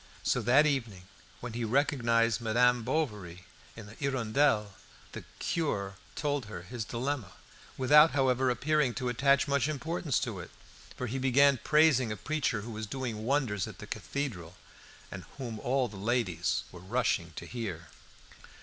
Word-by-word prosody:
So - - +1
that 135 +5 +5
evening, 115 -11 -1 0.4
when 120 -2 -6
he 120 +1 -3
recognised 115 -2 +2
Madame 120 +2 +3
Bovary 105 - -3 0.3
in 110 - -9
the 105 - -12
"Hirondelle," 125 -4 +1 0.4
the - - -8
cure 100 - -2 0.2
told 145 -4 -1
her 95 -5 -7
his 115 +4 -5
dilemma, 125 -1 -3 0.4
without, 150 +4 +7
however, 130 -2 +2
appearing 140 +1 +1
to 125 -2 -2
attach 140 +4 +3
much 140 0 +1
importance 155 0 -2
to - - -3
it, - - -8 0.5
for 125 - -3
he 130 +3 -3
began 135 0 +4
praising 150 -7 +4
a 105 - -4
preacher 135 -2 -1
who 115 +3 -7
was 110 0 -5
doing 115 -3 -4
wonders 125 -8 0
at - - -10
the - - -9
Cathedral, 95 - -5 0.6
and - - -7
whom 120 -5 -5
all 130 +2 +1
the 105 -3 -11
ladies 95 -6 0
were 90 - -11
rushing 95 -4 -1
to - - -7
hear. 95 -10 -6
125 Hz, 155 wpm, -30 LUFS, 110-140 Hz, 0.6 s, without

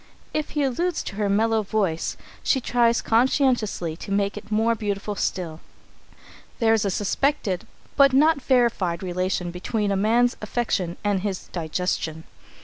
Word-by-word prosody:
If 305 -1 -1
he 290 - +3
alludes 320 +6 0
to 195 - -7
her 205 -1 0
mellow 220 +2 +2
voice, 195 -6 -1 0.2
she 265 - +2
tries 235 -1 +2
conscientiously 230 - +1
to 200 - -8
make 200 0 +1
it 210 0 -10
more 225 +2 +3
beautiful 205 -1 -3
still. 175 -5 -3 1.0
There 225 -2 +3
is 220 - +2
a 200 - 0
suspected 205 0 0 0.3
but 275 -1 +6
not 290 +2 +4
verified 230 -10 +1
relation 180 -1 -1
between 205 +4 -2
a - - +1
man's 230 +5 +2
affection 210 -6 -1
and 205 -2 +1
his 195 -1 -4
digestion. 160 -1 -2
210 Hz, 145 wpm, -24 LUFS, 185-240 Hz, 1.0 s, but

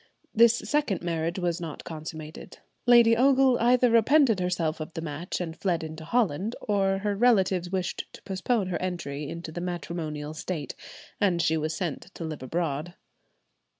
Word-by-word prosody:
This 235 +1 +6
second 285 - 0
marriage 170 0 -1
was 175 -2 -1
not 160 -3 -6
consummated; 155 -1 -8 0.3
Lady 235 -1 +7
Ogle 265 0 +4
either 245 +1 +4
repented 230 -1 +4
herself 175 -3 -1
of 155 +2 -6
the 165 - -3
match 160 +2 -4
and 165 -3 -4
fled 175 -4 -1
into 160 0 -7
Holland, 210 0 0
or 195 -2 +1
her 205 +1 -1
relatives 190 -6 +3
wished 185 -1 -3
to - - -13
postpone 195 +1 -1
her 175 - -2
entry 150 -6 -4
into 165 -1 -6
the 175 - -5
matrimonial 160 -4 -4
state, 160 -2 -4 0.5
and 185 -4 +2
she 160 -1 +2
was 155 0 -1
sent 175 0 -4
to - - -6
live 155 -4 -5
abroad. 160 +3 -3
175 Hz, 160 wpm, -27 LUFS, 160-210 Hz, 0.5 s, Lady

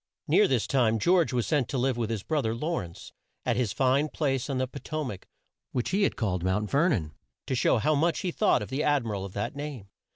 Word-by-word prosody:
Near - - +5
this 125 -5 +1
time 120 -5 +2
George 170 - +3
was 120 -3 0
sent 145 -7 +1
to 135 - -2
live 130 0 +1
with 115 -2 -2
his 110 -3 -3
bro 155 -2 0
ther 110 -2 -1
Law 160 +8 -1
rence, 85 -1 -9 0.3
at 120 - +1
his 120 -4 0
fine 135 +5 +2
place 135 -4 -1
on 135 - -1
the 130 0 0
Po 140 - -9
to 155 -1 -3
mac, 100 -8 -7 0.5
which 125 - -1
he 195 +2 +1
had 200 - +2
called 95 -6 -1
Mount 95 +3 0
Ver 155 +6 +3
non, 80 - -1 0.3
to - - -2
show 125 - +3
how 135 +8 +2
much 165 +3 +1
he 180 - -1
thought 210 +4 +2
of - - -8
the 135 +3 -1
ad 145 -4 +2
mi 110 - -3
ral 100 -2 -3
of 95 - -9
that 100 +6 -3
name. 140 -9 -6
130 Hz, 260 wpm, -28 LUFS, 110-150 Hz, 0.5 s, Near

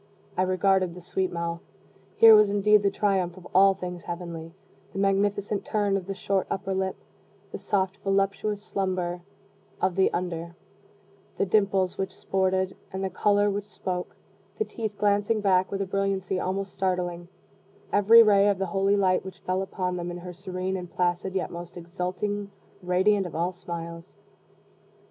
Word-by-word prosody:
I - - +1
regarded 185 -1 +2
the 180 - -10
sweet 185 +1 -2
mouth. 170 0 -3 0.5
Here 225 -1 +9
was 210 -1 +7
indeed 205 +1 +4
the 200 - +3
triumph 190 -3 0
of 180 - -11
all 195 +1 +6
things 180 -2 -6
heavenly 170 -2 -6 0.4
the - - -7
magnificent 200 +1 +1
turn 205 -2 0
of 190 -2 -3
the 195 - -3
short 195 0 -1
upper 195 0 -2
lip 190 0 -1 0.6
the - - -6
soft, 195 -1 -1
voluptuous 200 +1 0
slumber 185 -3 -2 0.6
of 185 -2 +1
the 190 - +3
under 170 -1 -4 0.8
the - - +2
dimples 195 -2 +1
which 190 - -3
sported, 190 0 0 0.2
and 190 0 -4
the 190 - -2
color 205 0 +2
which 205 +1 -4
spoke 180 -3 -5 0.4
the 435 - 0
teeth 220 - -5
glancing 205 +1 +2
back, 190 -2 +2
with 195 0 -1
a - - -4
brilliancy 195 -1 -1
almost 195 +2 -3
startling, 180 -2 -2 0.7
every 225 +3 +8
ray 205 -2 +5
of 200 - +1
the 195 - -1
holy 195 +1 +3
light 185 -2 +2
which 190 0 -10
fell 185 +1 -1
upon 185 -1 -3
them 175 0 -4
in 175 - -5
her 180 0 -8
serene 185 +1 -4
and 180 -1 -7
placid 180 +2 -1
yet 190 - -1
most 175 +1 -8
exultingly 185 +4 -3 0.3
radiant 185 +2 +2
of 160 - -10
all 175 +3 0
smiles. 170 0 -7
190 Hz, 165 wpm, -26 LUFS, 180-200 Hz, 0.8 s, Here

